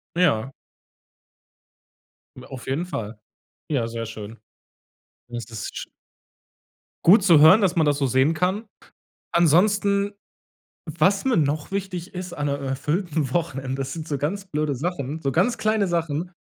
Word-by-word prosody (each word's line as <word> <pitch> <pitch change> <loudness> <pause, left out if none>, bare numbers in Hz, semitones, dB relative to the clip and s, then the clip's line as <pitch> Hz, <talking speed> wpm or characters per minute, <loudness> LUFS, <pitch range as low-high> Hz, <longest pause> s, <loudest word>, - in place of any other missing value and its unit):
Ja. 135 -8 +2 1.8
Hm, 125 - -11
auf 130 -2 -10
jeden 150 +7 -1
Fall. 110 - -5 0.5
Ja, 135 -7 0
sehr 115 0 -5
schön. 110 +1 -9 0.9
Das 120 -3 -6
ist 110 -3 -7
sch - - -5 1.2
Gut 190 +3 +7
zu 170 -6 +6
hören, 170 +8 +8
dass 190 -4 +2
man 160 -3 +3
das 145 -1 +2
so 135 - +1
sehen 130 +5 +3
kann. 185 +7 -1 0.7
Ansonsten, 200 +4 +3 0.7
was 185 +4 +1
mir 260 -3 +2
noch 150 +1 0
wichtig 185 -2 -4
ist 180 -1 -6
an 145 -2 -2
'ne, 140 0 -1
äh, 140 - -6
erfüllten 150 +1 -1
Wochenende, 135 -5 -2
das 135 0 -4
sind 160 -1 -6
so 145 -3 -2
ganz 180 +8 -2
blöde 150 -4 -1
Sachen, 150 0 -3
so 135 - 0
ganz 240 - +2
kleine 215 -2 +1
Sachen, 165 0 -2
155 Hz, 150 wpm, -23 LUFS, 135-180 Hz, 1.8 s, hören